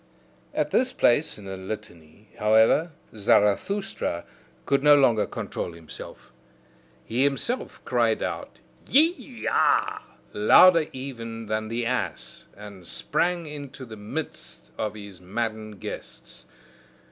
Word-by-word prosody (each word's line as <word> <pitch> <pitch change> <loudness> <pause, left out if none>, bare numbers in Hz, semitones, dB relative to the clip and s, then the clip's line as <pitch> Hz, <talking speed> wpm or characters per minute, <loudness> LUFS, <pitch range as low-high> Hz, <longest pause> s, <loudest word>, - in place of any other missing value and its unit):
At - - 0
this 255 0 +2
place 145 +6 +2
in 105 - -12
the 95 0 -5
litany, 95 -1 -9
however, 110 +10 +4 0.2
Zarathustra 105 - +1 0.4
could 140 0 +2
no 150 0 +7
longer 120 -7 +4
control 85 - -5
himself; 80 -5 -11 0.7
he 120 +4 +1
himself 140 - -1
cried - - +1
out - - -5 0.3
YE 300 -4 +2
A, - - +2 0.3
louder 185 -5 +6
even 115 -4 -6
than 110 0 -2
the 115 +1 -2
ass, 115 -8 -3
and 100 -4 -11
sprang 175 -1 -1
into 145 -3 -8
the 110 -2 -9
midst 105 - -6
of 105 +5 -3
his 100 -4 -10
maddened 110 +1 -4
guests. - - -9
115 Hz, 115 wpm, -25 LUFS, 105-145 Hz, 0.7 s, no